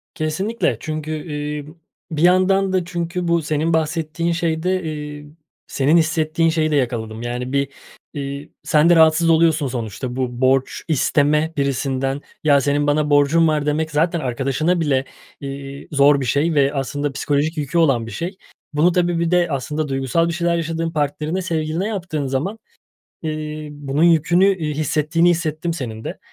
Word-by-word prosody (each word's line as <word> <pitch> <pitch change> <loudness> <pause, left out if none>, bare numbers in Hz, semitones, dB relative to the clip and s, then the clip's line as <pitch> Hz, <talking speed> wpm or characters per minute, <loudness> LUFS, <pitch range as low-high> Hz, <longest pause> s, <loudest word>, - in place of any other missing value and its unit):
Kesinlikle, 170 - -1
çünkü, 155 +2 -4 0.2
iii, 150 0 -4
b - - -11 0.4
bir 155 -1 -2
yandan 185 +2 +3
da 185 -2 +1
çünkü 175 0 -3
bu 170 0 +2
senin 155 +2 0
bahsettiğin 160 +1 -1
şeyde, 170 +2 0
iii, 150 -2 -6 0.4
senin 145 +5 +2
hissettiğin 160 0 +1
şeyi 160 -1 0
de - - +2
yakaladım. 115 -4 -2
Yani, 125 +1 -4
bir, 140 0 +1 0.4
iii, 140 +1 -6
sen 155 +2 +3
de 175 - +6
rahatsız 160 +1 +5
oluyorsun 160 -2 +3
sonuçta. 120 0 -4
Bu 125 -1 -3
borç 130 0 +2
isteme 150 +1 +2
birisinden, 135 0 -1 0.2
"Ya, 145 -2 +4
senin 145 +1 +1
bana 150 +1 +1
borcun 145 +3 +4
var," 150 -2 0
demek 155 +2 0
zaten 165 +3 +1
arkadaşına 135 +6 0
bile, 135 -4 +1 0.4
iii, 140 0 -7
zor 140 0 +5
bir - - -2
şey 145 +6 +1
ve 140 -1 +3
aslında 145 +1 -2
psikolojik 145 +3 -1
yükü 150 +3 -2
olan 135 -9 +3
bir - - -7
şey. 175 - -5 0.4
Bunu 155 +4 +3
tabii, 175 -1 +1
bir 170 0 0
de 175 -1 +3
aslında 150 +2 -2
duygusal 135 +4 0
bir 170 - -2
şeyler 170 0 0
yaşadığın 165 0 -2
partnerine, 150 +3 -1
sevgiline 165 +1 -2
yaptığın 175 -9 -3
zaman, 150 +12 -2 0.6
iii, 155 -1 -4
bunun 145 0 -2
yükünü, 170 +2 +4
iii, 155 -4 -3
hissettiğini 155 +3 +1
hissettim 165 0 -1
senin 115 -8 -6
de. - - -5
155 Hz, 160 wpm, -20 LUFS, 140-165 Hz, 0.6 s, de